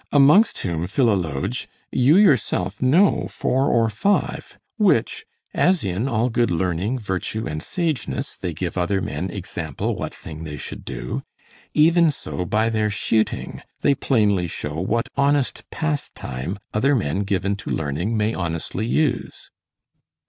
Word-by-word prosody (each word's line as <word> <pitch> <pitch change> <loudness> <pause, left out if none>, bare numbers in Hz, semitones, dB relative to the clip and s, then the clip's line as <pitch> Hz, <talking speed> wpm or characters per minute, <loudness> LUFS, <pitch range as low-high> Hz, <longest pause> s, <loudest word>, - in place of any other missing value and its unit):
amongst 150 +10 +6
whom, 85 -1 -1
Philologe, 95 - 0 0.2
you 135 +7 +4
yourself 110 - +2
know 165 +11 +4
four 135 +2 0
or 115 -1 +3
five, 115 - -1 0.2
which, 190 - +2 0.3
as 180 -5 +3
in 100 +5 -1
all 120 -2 +1
good 120 0 +1
learning, 90 +7 0
virtue, 105 0 -3
and 75 0 -4
sageness, 155 - -2
they 90 - -4
give 85 +3 -3
other 95 +2 +1
men 85 +2 -3
example - - -4
what - - -4
thing 80 0 -9
they 75 -2 -6
should - - -7
do, - - -4 0.5
even 165 +2 +5
so 135 -9 -4
by 110 +5 +1
their 110 -1 +1
shooting 110 +1 -1 0.2
they 140 - +4
plainly 105 -9 +2
show 75 -1 -4
what 115 +6 0
honest 140 -1 +1
pastime 100 - -3 0.2
other 135 +7 +3
men 95 - 0
given 100 0 0
to 100 - -8
learning 80 +9 -1
may 105 +1 +1
honestly 85 +4 -3
use. 150 +2 -1
110 Hz, 140 wpm, -22 LUFS, 90-135 Hz, 0.5 s, amongst